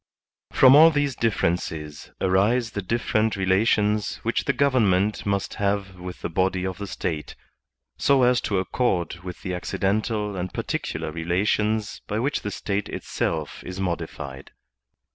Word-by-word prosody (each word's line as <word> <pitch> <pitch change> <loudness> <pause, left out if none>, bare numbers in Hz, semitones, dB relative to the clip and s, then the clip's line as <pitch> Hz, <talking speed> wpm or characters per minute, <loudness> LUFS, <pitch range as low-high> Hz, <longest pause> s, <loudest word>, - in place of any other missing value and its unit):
From 130 0 +7
all 160 +2 +9
these 145 -4 0
differences 80 -9 -2
arise 105 +6 +2
the 100 - -3
different 110 +1 0
relations 105 +2 +2
which - - 0
the - - +3
government 105 -8 +2
must 100 -1 -1
have 100 -2 -1
with 90 0 -8
the - - -2
body 95 +2 0
of 95 0 -4
the 100 - -5
State, 80 -5 -4 0.6
so 140 -2 +4
as 125 0 +4
to 100 - -1
accord 95 -4 0
with 90 -1 -8
the 90 - -3
accidental 105 +3 -1
and 90 0 -3
particular - - -3
relations 105 +6 0
by 105 - -2
which 135 +6 0
the 105 - -3
State 100 0 -3
itself 80 -3 -3
is 90 +1 -7
modified. 80 -7 -4
100 Hz, 145 wpm, -24 LUFS, 90-110 Hz, 0.6 s, all